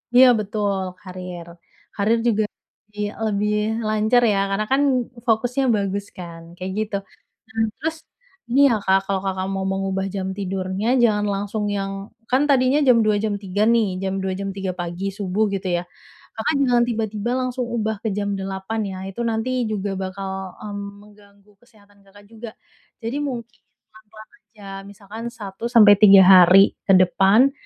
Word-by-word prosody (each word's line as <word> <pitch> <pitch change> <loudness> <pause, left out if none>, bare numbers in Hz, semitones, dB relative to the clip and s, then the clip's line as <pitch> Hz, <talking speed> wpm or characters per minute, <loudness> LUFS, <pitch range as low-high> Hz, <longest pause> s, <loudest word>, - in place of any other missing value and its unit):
Iya, 255 +1 +8
betul, 205 -1 -2 0.2
karir. 180 -2 -8 0.5
Karir 215 +3 +2
juga 215 -2 +2 0.4
lebih 210 0 -5 0.2
lebih 210 0 0 0.3
lancar 215 +3 +2
ya, 195 - +1
karena 195 +2 -1
kan 270 +1 +3 0.5
fokusnya 245 +4 +1
bagus 200 0 -2
kan, 170 -2 -9
kayak 185 +1 -6
gitu. 215 -1 -2 0.5
Mmm, 225 0 -1
terus 320 +1 -3 0.5
ini 255 +4 +2
ya, - - +2
Kak, 190 0 +4
kalau 195 -1 -1
Kakak 190 -1 -2
mau 190 0 -2
mengubah 195 0 -2
jam 190 -1 -3
tidurnya, 190 +1 -3 0.2
jangan 210 -3 +2
langsung 205 +2 -3
yang 195 0 -3 0.4
kan 260 +2 +3
tadinya 265 +1 +3
jam 250 -2 +6
02:00, 215 -1 +3
jam 215 -2 0
03:00 195 +1 -2
nih, 230 -2 +3 0.2
jam 190 0 -1
02:00, 190 - -1
jam 200 0 -3
03:00 195 -1 -3
pagi 175 +2 -4
subuh, 200 +1 -1
gitu 195 -1 -3
ya, 175 - -4 0.6
Kakak 250 +7 0
jangan 245 -2 +3
tiba-tiba 220 -1 -3
langsung 255 0 -2
ubah 220 -1 -1
ke - - -1
jam 205 -1 -1
08:00 190 +3 -4
ya, 190 - -7
itu 195 - -12
nanti 225 +2 -2 0.2
juga 205 -1 -2
bakal, 190 0 -5
mmm, 205 -1 -6 0.2
mengganggu 205 -1 -21
kesehatan 205 -4 -24
Kakak 205 +1 -18
juga. 225 +1 -9 0.5
Jadi 230 +5 -3
mungkin 240 -6 -5 0.3
pelan-pelan 215 0 -16
aja, 210 -1 -16 0.2
misalkan 205 +2 -10
1-3 210 -2 +5
hari 185 +1 +7
ke 195 - +5
depan, 195 +7 +4
205 Hz, 155 wpm, -22 LUFS, 195-225 Hz, 0.6 s, Iya